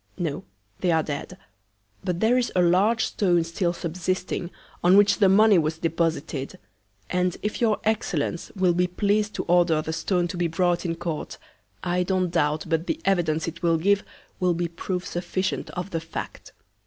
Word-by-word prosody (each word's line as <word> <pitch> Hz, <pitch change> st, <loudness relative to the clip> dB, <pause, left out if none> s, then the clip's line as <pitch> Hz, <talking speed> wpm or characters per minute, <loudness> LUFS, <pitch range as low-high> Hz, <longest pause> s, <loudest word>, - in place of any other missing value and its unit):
No, 170 Hz, 0 st, -3 dB, 0.3 s
they 180 Hz, -, 0 dB
are 160 Hz, -1 st, +3 dB
dead; 145 Hz, -2 st, -5 dB, 0.7 s
but 180 Hz, -2 st, -2 dB
there 225 Hz, +3 st, +4 dB
is 250 Hz, -1 st, +1 dB
a 180 Hz, -, +4 dB
large 200 Hz, +6 st, +3 dB
Stone 175 Hz, -4 st, +2 dB
still 170 Hz, +1 st, -1 dB
subsisting, 180 Hz, +1 st, -3 dB, 0.3 s
on 180 Hz, +3 st, +6 dB
which 205 Hz, +1 st, +5 dB
the 195 Hz, -2 st, +5 dB
Money 205 Hz, 0 st, +6 dB
was 160 Hz, 0 st, -1 dB
deposited; 165 Hz, -2 st, -2 dB, 0.5 s
and 180 Hz, -1 st, 0 dB
if 210 Hz, +3 st, -3 dB
your 220 Hz, -3 st, +2 dB
Excellence, 180 Hz, -7 st, -1 dB
will 185 Hz, -2 st, +3 dB
be 180 Hz, +1 st, +2 dB
pleas'd 205 Hz, +3 st, 0 dB
to -, -, -2 dB
order 175 Hz, -2 st, +3 dB
the 155 Hz, +1 st, -3 dB
Stone 175 Hz, +2 st, 0 dB
to 175 Hz, -, -5 dB
be 175 Hz, -1 st, +1 dB
brought 175 Hz, +1 st, 0 dB
in 165 Hz, -, -1 dB
Court, 165 Hz, -2 st, -5 dB, 0.5 s
I 180 Hz, 0 st, 0 dB
don't 185 Hz, -1 st, 0 dB
doubt 155 Hz, -2 st, +1 dB
but 165 Hz, +1 st, -1 dB
the 315 Hz, -, -1 dB
Evidence 170 Hz, -5 st, +1 dB
it 170 Hz, +1 st, -6 dB
will 165 Hz, -2 st, +3 dB
give, 200 Hz, +5 st, +2 dB, 0.4 s
will 180 Hz, -2 st, +2 dB
be 175 Hz, 0 st, -1 dB
Proof 180 Hz, +2 st, -4 dB
sufficient 185 Hz, +2 st, -2 dB
of 180 Hz, +2 st, -5 dB
the 165 Hz, -, -2 dB
Fact. 165 Hz, 0 st, -7 dB
175 Hz, 180 wpm, -25 LUFS, 165-190 Hz, 0.7 s, on